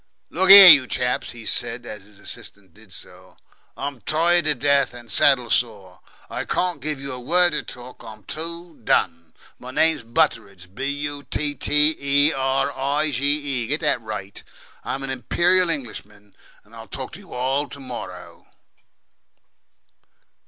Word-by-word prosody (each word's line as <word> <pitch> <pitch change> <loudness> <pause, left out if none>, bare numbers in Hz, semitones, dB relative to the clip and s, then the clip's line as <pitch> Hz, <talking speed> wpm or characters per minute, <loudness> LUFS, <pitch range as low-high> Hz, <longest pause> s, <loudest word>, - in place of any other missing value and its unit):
"Look 185 +3 0
here, 195 -1 +12
you 145 -6 +8
chaps," 125 0 -2
he 115 -2 -10
said, 120 +1 -2
as 105 -4 -9
his 105 -1 -20
assistant 100 -2 -9
did 105 0 -19
so, - - -13 0.4
"I'm 140 -3 -6
tired 170 +5 +1
to 150 -1 +1
death, 140 -1 +1
and 120 -2 -12
saddle 125 -5 +3
sore. 100 -6 -2 0.3
I - - -5
can't 180 -5 -1
give 150 0 -3
you 135 -1 -6
a 125 - -7
word 175 +6 +2
of 150 - -3
talk. 125 +1 -11
I'm 110 -1 -12
too 165 - -5
done. 85 -5 -1 0.2
My 125 - -10
name's 160 +3 +1
Butteridge. 110 - -2
B 130 +6 -5
U 145 0 -4
T 150 -1 -2
T 150 +3 +2
E 140 +2 +2
R 135 +1 0
I 140 +3 0
D 150 - -2
G 135 +1 -2 0.4
E. - - -7
Get 150 +6 -2
that 150 -6 0
right. 105 -3 -8 0.4
I'm 135 - -5
an 135 - -4
Imperial 175 +8 +1
Englishman. 105 -8 -6 0.3
I'll - - -13
talk - - -7
to - - -11
you - - -13
all 135 +3 -1
to 140 - -11
morrow." 120 -9 -9
135 Hz, 165 wpm, -22 LUFS, 115-150 Hz, 0.4 s, here